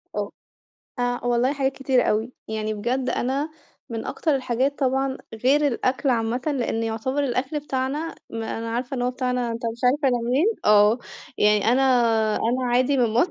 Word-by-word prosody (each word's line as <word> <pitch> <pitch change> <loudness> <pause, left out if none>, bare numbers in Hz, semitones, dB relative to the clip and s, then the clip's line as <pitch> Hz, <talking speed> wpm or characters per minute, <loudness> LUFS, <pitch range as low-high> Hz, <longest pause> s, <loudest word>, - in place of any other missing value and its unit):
آه. - - -2 0.7
آآ 245 0 0
والله 245 +3 +2
حاجات 270 -1 0
كتيرة 265 -2 +1
أوي، 220 +4 0 0.2
يعني 215 0 -2
بجد 245 +5 -1
أنا 275 +5 -1 0.4
من 225 -1 -4
أكتر 310 -3 0
الحاجات 260 +1 0
طبعًا 265 0 0 0.3
غير 290 +3 +4
الأكْل 260 +1 0
عامةً 230 +1 0
لأن 250 -6 -1
يعتبر 230 +6 -1
الأكْل 265 +4 -1
بتاعنا 280 +3 -3 0.2
ما 225 0 -4
أنا 230 0 -4
عارفة 245 +3 -3
إن 245 - -2
هو 250 - +1
بتاعنا، 250 -1 -1
أنت 230 - -5
مش 235 - -13
عارف 250 +4 +4
أنا 250 -2 +3
منين؟ 275 +8 +3 0.2
آه، 210 +2 +5 0.4
يعني 210 -1 +4
أنا 265 - +3 0.5
أنا 250 +3 0
عادي 255 +3 +3
من 245 -3 +3
مصر، 245 +11 +2
250 Hz, 170 wpm, -24 LUFS, 230-270 Hz, 0.7 s, آه